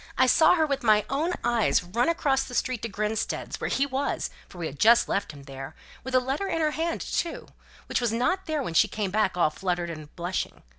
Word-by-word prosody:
I 260 - +5
saw 315 +7 +5
her 320 -2 +3
with 280 -2 -1
my 215 -3 +4
own 315 +6 0
eyes 235 -6 +2
run 230 - 0
across 275 -5 +1
the 245 - -8
street 250 -2 -1
to 230 - -3
Grinstead's, 215 +2 -3
where - - -1
he 275 - +1
was, 275 0 -2 0.2
for - - -13
we 170 - -4
had 140 -2 -6
just 235 +2 +6
left 200 - -1
him 145 -2 -13
there; 135 0 -8 0.3
with 260 0 -3
a - - +7
letter 270 +9 -2
in 330 - -1
her 310 -1 +2
hand, 330 +2 -2
too, 340 - -3 0.4
which - - -1
was 240 -2 +1
not 345 +12 0
there 310 -3 -1
when 170 - -4
she - - +5
came 205 -3 -3
back 205 -3 +1
all 160 -3 +3
fluttered 175 -1 -2
and 155 -2 -9
blushing. 175 +1 -4
235 Hz, 235 wpm, -26 LUFS, 185-280 Hz, 0.4 s, a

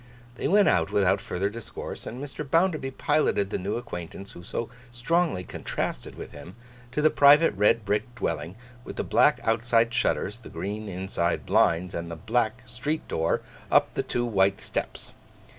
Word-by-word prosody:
They - - -2
went 205 +1 +5
out 85 +1 +3
without 100 -1 +3
further 95 +2 -2
discourse; 110 +2 -7
and 120 - -6
Mr. 145 +1 -6
Bounderby 160 -1 +1
piloted 105 -7 +1
the - - -1
new 100 +3 -2
acquaintance 95 -4 -7
who - - -11
so 115 +6 -4 0.2
strongly 125 - 0
contrasted - - -4
with - - -8
him, 90 +4 -11 0.4
to 150 - 0
the 155 - +5
private 145 +3 +6
red 105 +2 +3
brick 105 +4 -1
dwelling, 80 -6 -3 0.3
with - - -8
the - - -2
black - - +4
outside 115 +1 +2
shutters, 105 0 0
the 120 - -12
green 105 +5 -5
inside 90 -2 -2
blinds, 90 +2 +2
and 85 0 -4
the 85 - -5
black 110 +5 -1
street 130 +6 -3
door 80 +1 0 0.3
up - - +4
the - - 0
two 120 - -1
white 100 -3 +2
steps. - - -5
110 Hz, 170 wpm, -26 LUFS, 95-125 Hz, 0.4 s, private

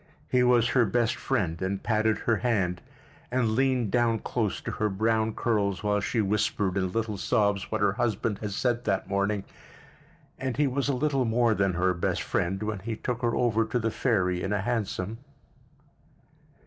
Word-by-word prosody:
He 125 - +4
was 125 -1 +4
her 125 - +4
best 115 +3 +1
friend 100 -10 -1
and 95 +1 -2
patted 110 -1 +2
her 115 -2 +3
hand—and 110 +3 -2
leaned 125 -2 +1
down 120 -2 +2
close 110 -2 -2
to - - -4
her 105 - -1
brown 110 +2 0
curls 100 -4 0
while 105 0 +2
she 110 +3 0
whispered 100 -2 0
in 95 -2 0
little 110 0 -2
sobs 100 -2 +1
what 110 -2 -1
her 100 -1 +4
husband 110 -2 -1
had 105 - -4
said 120 +4 -1
that 95 -3 0
morning; 100 +1 0 1.0
and 130 -2 -3
he 150 - +3
was 140 +1 -1
a 140 - +1
little 135 -1 +1
more 115 0 +3
than 100 -2 +1
her 90 +1 +2
best 85 - -1
friend 95 +4 -1
when 105 -2 -3
he 110 +4 -4
took 125 +2 -3
her 120 -1 +1
over 115 -2 +2
to 110 +2 -1
the 115 -1 0
ferry 90 -9 +1
in 95 - -2
a 100 -2 0
hansom. 110 -1 -2
110 Hz, 180 wpm, -27 LUFS, 100-120 Hz, 1.0 s, He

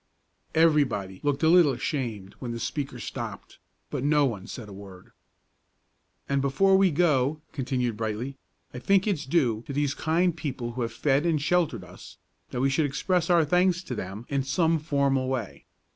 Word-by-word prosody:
Everybody 140 - +2
looked 145 +1 -1
a - - +5
little 165 -4 +6
ashamed 120 - -3
when 125 -2 -5
the 115 - -4
speaker 135 +3 -3
stopped, - - -7 0.3
but - - -3
no 145 0 +4
one 105 -7 -3
said 115 -5 -8
a 100 - -10
word. 95 -2 -12 1.2
"And 140 0 +1
before 190 +9 +3
we 190 0 +5
go," 150 -3 +2
continued 125 -4 -2
Brightly, 115 +5 -3 0.4
"I 125 - -6
think 195 +7 +3
it's 170 -10 -1
due 125 -8 +1
to 140 - -5
these 145 0 0
kind 165 +3 +1
people 130 -7 -4
who 125 +1 -5
have 115 -1 -2
fed 135 +5 +1
and 160 -3 +2
sheltered 175 +3 +1
us, - - -13 0.3
that 125 - -3
we 135 - +3
should 145 +2 +2
express 170 +5 0
our 170 -3 +5
thanks 180 +2 +2
to 130 - -6
them 100 +1 -6
in 140 -1 0
some 160 +5 +1
formal 140 -4 +1
way. 125 -6 -4
140 Hz, 175 wpm, -27 LUFS, 120-160 Hz, 1.2 s, little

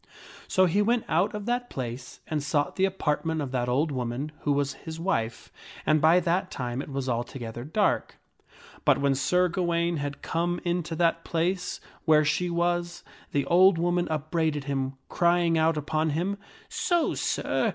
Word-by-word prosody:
So 185 - +4
he 185 +4 +2
went 235 +2 +1
out 190 +7 +1
of 210 -1 -5
that 245 +1 -1
place 125 0 -6
and 155 -2 -2
sought 145 0 0
the 190 - +3
apart 185 -6 -1
ment 160 -1 -1
of 140 -4 -3
that 125 -2 -1
old 145 +5 +1
woman 130 +3 -3
who 145 - -1
was 140 -1 +1
his 160 +2 -8
wife, 120 -11 -2 0.3
and 155 -1 +3
by 160 +4 +6
that 185 +2 0
time 125 0 -3
it - - -8
was 135 -1 -3
alto 120 +1 -2
gether 120 -1 -6
darkj 195 +9 0 0.7
But 145 -2 +4
when 140 0 +2
Sir 180 +7 +2
Gawaine 170 -1 0
had 140 -1 -5
come 175 +1 -1
into 175 -2 -1
that 165 0 +1
place 180 +2 -1 0.3
where 155 -2 +5
she 180 +4 +1
was, 175 0 -1 0.3
that 140 -1 +1
ola 180 +2 +5
woman 175 +1 +1
upbraided 155 -1 -1
him, 135 -1 -2
crying 170 -1 +2
out 160 0 +2
upon 155 +2 0
him, 180 +7 -1 0.2
" - - -26 0.2
So, 345 -3 +2
Sir - - 0
160 Hz, 180 wpm, -27 LUFS, 140-175 Hz, 0.7 s, by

